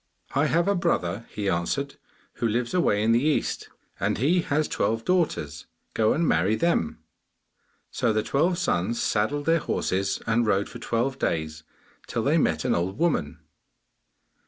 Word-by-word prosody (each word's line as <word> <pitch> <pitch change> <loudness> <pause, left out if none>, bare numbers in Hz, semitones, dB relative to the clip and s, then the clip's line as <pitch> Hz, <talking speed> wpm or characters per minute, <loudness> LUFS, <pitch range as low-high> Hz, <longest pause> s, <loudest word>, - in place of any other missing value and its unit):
'I 145 +3 +2
have 170 +3 +2
a 200 - +3
brother,' 115 - -1
he 105 -1 -4
answered, 115 +11 -1 0.4
'who 115 - 0
lives 120 +2 -1
away 105 - +2
in 115 - +3
the 115 +1 +4
East, 155 0 0 0.3
and 100 +3 0
he 160 - +2
has 155 -1 0
twelve 115 +1 -1
daughters; 115 - -1 0.3
go 110 -1 +2
and 165 +1 +1
marry 95 +7 +2
them.' 165 - 0 0.9
So 115 - +1
the 110 0 0
twelve 170 +9 +1
sons 115 - 0
saddled 140 +8 0
their 165 0 +3
horses 95 -8 -1
and 115 0 +1
rode 100 -1 +1
for 120 - -9
twelve 120 +4 -1
days, 80 -1 -2 0.5
till - - -2
they - - +3
met - - 0
an - - +2
old 90 +4 -1
woman. 85 - 0
115 Hz, 160 wpm, -25 LUFS, 95-150 Hz, 0.9 s, the